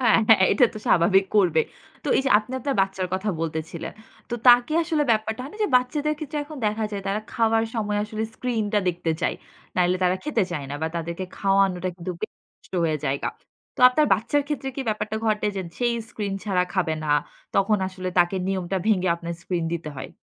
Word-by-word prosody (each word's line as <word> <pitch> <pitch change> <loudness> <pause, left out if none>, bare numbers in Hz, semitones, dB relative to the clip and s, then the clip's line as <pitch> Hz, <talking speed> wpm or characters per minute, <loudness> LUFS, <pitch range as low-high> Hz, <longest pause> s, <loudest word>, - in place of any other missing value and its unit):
হ্যাঁ, 225 -3 +5
হ্যাঁ 215 -4 +7
এটা 245 - +5
তো - - -5
স্বাভাবিক 190 +3 +4
করবে। 175 -6 +4 0.4
তো - - -2
এই - - +2
যে - - +2
আপনি 220 +4 -8
আপনার 275 +2 -1
বাচ্চার 190 -1 -2
কথা 195 +3 -2
বলতেছিলেন। 160 0 -4 0.4
তো - - -1
তাকে 245 +4 +7
আসলে 315 -2 0
ব্যাপারটা 220 +1 0
হয় 275 - -7
না - - -10
যে - - 0
বাচ্চাদের 290 +5 0
ক্ষেত্রে 300 -1 -4
এখন 305 +1 -10
দেখা 215 +1 0
যায়, 200 -1 -3
তারা 205 +2 0
খাওয়ার 225 -1 +2
সময় 210 -2 -1
আসলে 215 0 -4
স্ক্রিনটা 220 -4 0
দেখতে 175 -1 -1
চায়। - - +1 0.4
নাইলে 180 0 +3
তারা 180 +1 +3
খেতে 280 -8 +1
চায় 145 - -3
না 145 - -3
বা 160 - +1
তাদেরকে 170 +2 -4
খাওয়ানোটা 195 -2 +2
কিন্তু 180 0 -5
বেশ 215 - -4 0.3
কষ্ট - - -23
হয়ে 155 -2 0
যায়। 135 +1 -1 0.5
তো - - -6
আপনার 300 +4 +2
বাচ্চার 235 +8 0
ক্ষেত্রে 290 -2 -3
কি 275 - -2
ব্যাপারটা 215 0 -2
ঘটে 215 -1 +1
যে, 190 - -1
যেই 240 -1 +1
স্ক্রিন 205 -2 -4
ছাড়া 185 -3 +2
খাবে 175 -5 +1
না? 150 - -4 0.5
তখন 205 +2 +3
আসলে 185 -1 -5
তাকে 175 +2 +3
নিয়মটা 190 -1 -1
ভেঙে 185 -4 +3
আপনার 170 0 -5
স্ক্রিন 175 -3 -2
দিতে 165 -2 -3
হয়। 130 +1 -6
200 Hz, 200 wpm, -24 LUFS, 180-230 Hz, 0.5 s, হ্যাঁ